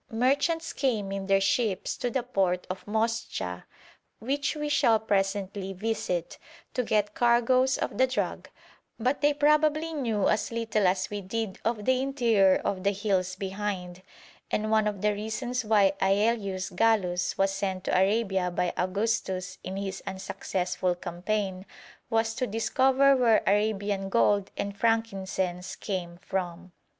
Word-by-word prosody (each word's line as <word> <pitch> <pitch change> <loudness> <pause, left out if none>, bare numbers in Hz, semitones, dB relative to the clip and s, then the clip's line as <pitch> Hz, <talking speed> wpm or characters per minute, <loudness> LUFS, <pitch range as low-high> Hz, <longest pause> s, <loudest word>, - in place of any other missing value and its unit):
Merchants 285 +8 +1
came 220 -8 -1
in 195 -1 -4
their 195 0 +4
ships 195 0 0
to 245 - -1
the 245 +1 -1
port 190 -7 0
of 185 - -8
Moscha, 220 - -2 0.5
which 275 +6 -1
we 300 0 -3
shall 230 -6 +3
presently 195 -2 -1
visit, 185 -4 -3 0.3
to 250 - +1
get 210 -2 +1
cargoes 245 +3 +3
of - - -3
the 260 - +5
drug, 255 - -3 0.5
but 255 +5 0
they 290 0 +4
probably 300 +2 +2
knew 230 -9 0
as 215 - 0
little 225 -3 +1
as 185 +2 0
we 205 0 -3
did 200 +1 -4
of 220 -2 -1
the 260 0 +3
interior 230 -8 +3
of 190 -2 -1
the 200 - +3
hills 190 -2 -1
behind, 190 -2 -4 0.5
and 215 0 -1
one 215 -1 +3
of 205 -3 -3
the 210 0 +3
reasons 240 +4 -3
why 205 -3 +4
Aelius 195 -1 +1
Gallus 180 -3 +1
was 195 0 +2
sent 195 -1 -3
to - - 0
Arabia 190 -1 +2
by 175 0 -1
Augustus 185 -1 -1
on 190 +2 -5
his 195 -1 -4
unsuccessful 185 -1 -2
campaign 185 +2 -3 0.5
was 225 -1 +1
'to 255 +2 -2
discover 265 +5 +3
where 235 -4 +4
Arabian 205 -1 0
gold 205 -2 +2
and 200 0 -3
frankincense 190 -5 -1
came 175 -4 -4
from.' 180 -1 -4
205 Hz, 145 wpm, -28 LUFS, 190-230 Hz, 0.5 s, the